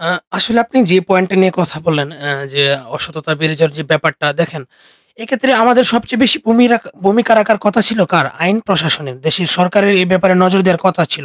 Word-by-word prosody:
আ 165 Hz, -, -4 dB, 0.3 s
আসলে 235 Hz, 0 st, +1 dB
আপনি 250 Hz, +3 st, -2 dB
যে 185 Hz, -, +4 dB
পয়েন্ট 190 Hz, -1 st, +2 dB
টা 195 Hz, -, -2 dB
নিয়ে 185 Hz, -1 st, +2 dB
কথা 170 Hz, -3 st, -4 dB
বললেন, 150 Hz, -4 st, -1 dB
অ্যা 145 Hz, 0 st, -4 dB, 0.2 s
যে 140 Hz, 0 st, +2 dB, 0.3 s
অসততা 160 Hz, -1 st, -6 dB
বেড়ে 155 Hz, 0 st, 0 dB
যাওয়ার 160 Hz, -2 st, 0 dB
যে -, -, -5 dB
ব্যাপারটা 155 Hz, -1 st, 0 dB
দেখেন; 160 Hz, -3 st, -4 dB, 0.6 s
এক্ষেত্রে 265 Hz, +3 st, -2 dB
আমাদের 245 Hz, +2 st, +4 dB
সবচেয়ে 235 Hz, +1 st, -2 dB
বেশি 270 Hz, +6 st, +2 dB
ভূমিরা 240 Hz, +1 st, +4 dB, 0.3 s
ভূমিকা 225 Hz, +4 st, +2 dB
রাখার 215 Hz, 0 st, +1 dB
কথা 210 Hz, +2 st, +2 dB
ছিল 225 Hz, -2 st, -1 dB
কার? 165 Hz, -5 st, +2 dB, 0.2 s
আইন 190 Hz, +5 st, +1 dB
প্রশাসনের। 155 Hz, -8 st, -2 dB
দেশের 175 Hz, +1 st, +1 dB
সরকারের 200 Hz, +3 st, +2 dB
এই -, -, -1 dB
ব্যাপারে 185 Hz, 0 st, +2 dB
নজর 190 Hz, +1 st, +2 dB
দেওয়ার 180 Hz, -3 st, +1 dB
কথা 180 Hz, -2 st, +1 dB
ছিল। 150 Hz, -, -4 dB
185 Hz, 200 wpm, -13 LUFS, 160-225 Hz, 0.6 s, যে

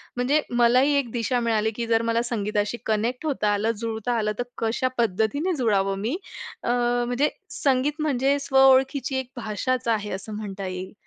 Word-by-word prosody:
म्हणजे 270 Hz, +5 st, +2 dB, 0.2 s
मला 240 Hz, +2 st, +5 dB
ही 290 Hz, +1 st, +3 dB
एक 240 Hz, -5 st, -4 dB
दिशा 240 Hz, +1 st, 0 dB
मिळाली, 220 Hz, -2 st, +1 dB
की 235 Hz, -1 st, -3 dB
जर 225 Hz, 0 st, +3 dB
मला 230 Hz, +1 st, +2 dB
संगीताशी 210 Hz, +1 st, -1 dB
कनेक्ट 235 Hz, +7 st, -1 dB
होता 210 Hz, -8 st, +1 dB
आलं, 215 Hz, +3 st, +1 dB
जुळता 225 Hz, +1 st, -2 dB
आलं, 210 Hz, -1 st, 0 dB
तर -, -, +1 dB, 0.2 s
कशा 230 Hz, +3 st, 0 dB
पद्धतीने 235 Hz, -, +1 dB
जुळावं 195 Hz, -5 st, +1 dB
मी. 250 Hz, -, -1 dB, 0.5 s
अ, -, -, -2 dB, 0.4 s
म्हणजे 265 Hz, +5 st, +1 dB, 0.3 s
संगीत 285 Hz, +3 st, +1 dB
म्हणजे 280 Hz, -1 st, +2 dB
स्व 270 Hz, -, +1 dB
ओळखीची 265 Hz, 0 st, +3 dB
एक 255 Hz, -1 st, -6 dB
भाषाच 235 Hz, +2 st, -2 dB
आहे 210 Hz, -2 st, 0 dB
असं 200 Hz, +3 st, -6 dB
म्हणता 195 Hz, -2 st, -5 dB
येईल. 185 Hz, +1 st, -6 dB
235 Hz, 175 wpm, -24 LUFS, 215-260 Hz, 0.5 s, मला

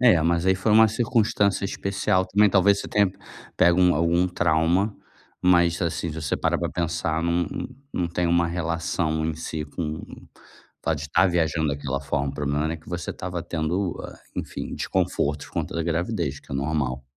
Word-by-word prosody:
É, 115 Hz, -10 st, +6 dB
mas 85 Hz, +2 st, +1 dB
aí 95 Hz, -, +5 dB
foi 95 Hz, +3 st, 0 dB
uma 110 Hz, +1 st, +7 dB
circunstância 110 Hz, -3 st, +1 dB
especial 95 Hz, -1 st, 0 dB
também, 105 Hz, +2 st, +4 dB
talvez, 100 Hz, +1 st, +4 dB
você -, -, -7 dB
tenha 100 Hz, -3 st, +3 dB, 0.4 s
pego 85 Hz, +1 st, +4 dB
um 90 Hz, -1 st, +5 dB
algum 85 Hz, +3 st, +2 dB
trauma, 90 Hz, +3 st, +1 dB, 0.5 s
mas, 85 Hz, -2 st, +4 dB
assim, 85 Hz, 0 st, -1 dB
se 80 Hz, +1 st, -6 dB
você 75 Hz, -, 0 dB
parar -, -, +1 dB
pra -, -, -2 dB
pensar, 80 Hz, -1 st, -1 dB
não 85 Hz, +1 st, +1 dB, 0.5 s
não 90 Hz, -2 st, -1 dB
tem 85 Hz, +1 st, -1 dB
uma 85 Hz, 0 st, +3 dB
relação 80 Hz, -2 st, -1 dB
em 80 Hz, -, -1 dB
si 80 Hz, -1 st, -4 dB
com 75 Hz, +1 st, -4 dB
o -, -, -12 dB, 0.5 s
fato -, -, 0 dB
de -, -, -6 dB
estar 80 Hz, +5 st, +3 dB
viajando 80 Hz, -3 st, +1 dB
daquela 70 Hz, -1 st, -2 dB
forma, 70 Hz, 0 st, -1 dB
o 70 Hz, -, -11 dB
problema 75 Hz, +1 st, -1 dB
era 80 Hz, +1 st, -1 dB
que 80 Hz, -, -19 dB
você 90 Hz, -2 st, -4 dB
estava 90 Hz, -2 st, -5 dB
tendo, 85 Hz, +2 st, -2 dB
ah, -, -, -9 dB, 0.2 s
enfim, -, -, -5 dB
desconforto 75 Hz, 0 st, -1 dB
por -, -, -18 dB
conta -, -, -3 dB
da 85 Hz, -, 0 dB
gravidez 85 Hz, -3 st, -2 dB
que -, -, -20 dB
é -, -, -2 dB
normal. 70 Hz, -2 st, -1 dB
85 Hz, 190 wpm, -24 LUFS, 80-90 Hz, 0.5 s, uma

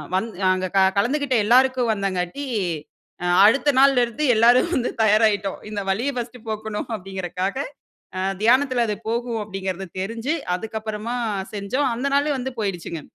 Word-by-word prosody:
வந்து 220 Hz, +2 st, -2 dB, 0.2 s
அங்க 185 Hz, 0 st, -2 dB
க -, -, +6 dB, 0.2 s
கலந்துகிட்ட 270 Hz, +3 st, 0 dB
எல்லாருக்கும் 250 Hz, 0 st, +4 dB
வந்தனால 195 Hz, +5 st, -3 dB, 0.8 s
அ -, -, -1 dB, 0.2 s
அடுத்த 275 Hz, +7 st, +4 dB
நாள்ல 270 Hz, -2 st, +5 dB
இருந்து 240 Hz, +6 st, -5 dB
எல்லாரும் 240 Hz, +7 st, +5 dB
வந்து 250 Hz, -1 st, 0 dB
தயாராயிட்டோம். 210 Hz, -2 st, +2 dB
இந்த 210 Hz, -1 st, -4 dB
வலிய 240 Hz, +9 st, -1 dB
ஃபர்ஸ்ட்டு 240 Hz, -1 st, -6 dB
போக்கணும் 215 Hz, 0 st, -4 dB
அப்டிங்கறதுக்காக, 190 Hz, +2 st, -4 dB, 0.6 s
அ -, -, -1 dB, 0.2 s
தியானத்துல 255 Hz, +1 st, +3 dB
அது 210 Hz, -, -1 dB
போகும் 235 Hz, 0 st, -2 dB
அப்டிங்கறது 195 Hz, -2 st, -5 dB
தெரிஞ்சு, 230 Hz, +8 st, -2 dB, 0.2 s
அதுக்கப்பறமா 220 Hz, +2 st, -5 dB, 0.4 s
செஞ்சோம். 255 Hz, +8 st, -1 dB
அந்த 250 Hz, +4 st, -4 dB
நாளே 290 Hz, +1 st, +2 dB
வந்து 260 Hz, +1 st, -4 dB
போயிடுச்சுங்க. 175 Hz, -5 st, -4 dB
225 Hz, 135 wpm, -22 LUFS, 195-255 Hz, 0.8 s, க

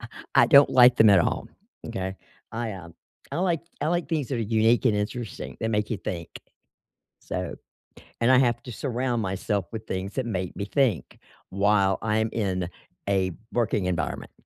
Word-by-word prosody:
I -, -, -8 dB, 0.3 s
I -, -, +6 dB
don't 140 Hz, 0 st, +7 dB
like 125 Hz, -1 st, +7 dB
them 110 Hz, -2 st, +7 dB
at 95 Hz, -, +7 dB
all, -, -, -1 dB, 0.4 s
m'kay? 95 Hz, 0 st, -4 dB, 0.4 s
I, 115 Hz, -1 st, -3 dB
um, 85 Hz, -3 st, -10 dB, 0.4 s
I -, -, -2 dB
like 175 Hz, -3 st, +1 dB, 0.2 s
I -, -, 0 dB
like 175 Hz, 0 st, 0 dB
things 155 Hz, -6 st, -1 dB
that 130 Hz, -, -2 dB
are -, -, -2 dB
unique 115 Hz, +3 st, +2 dB
and 110 Hz, -, +3 dB
interesting, 110 Hz, +2 st, -4 dB
that 110 Hz, -, -1 dB
make 105 Hz, 0 st, 0 dB
you 110 Hz, -, 0 dB
think. 85 Hz, -3 st, -5 dB, 0.9 s
So -, -, -4 dB, 0.7 s
and 120 Hz, +3 st, +4 dB
I 130 Hz, -, +7 dB
have 120 Hz, -2 st, +2 dB
to 125 Hz, -, -8 dB
surround 125 Hz, -1 st, -2 dB
myself 95 Hz, 0 st, -2 dB
with 110 Hz, 0 st, -6 dB
things 95 Hz, +1 st, -4 dB
that 130 Hz, -, -2 dB
make 95 Hz, -6 st, -3 dB
me 100 Hz, -, -4 dB
think 120 Hz, -, 0 dB, 0.3 s
while 100 Hz, -1 st, +2 dB
I'm 110 Hz, 0 st, 0 dB
in 95 Hz, -5 st, -1 dB, 0.4 s
a 95 Hz, -2 st, +1 dB, 0.2 s
working 110 Hz, -5 st, 0 dB
environment. 80 Hz, -7 st, -2 dB
110 Hz, 180 wpm, -26 LUFS, 95-120 Hz, 0.9 s, don't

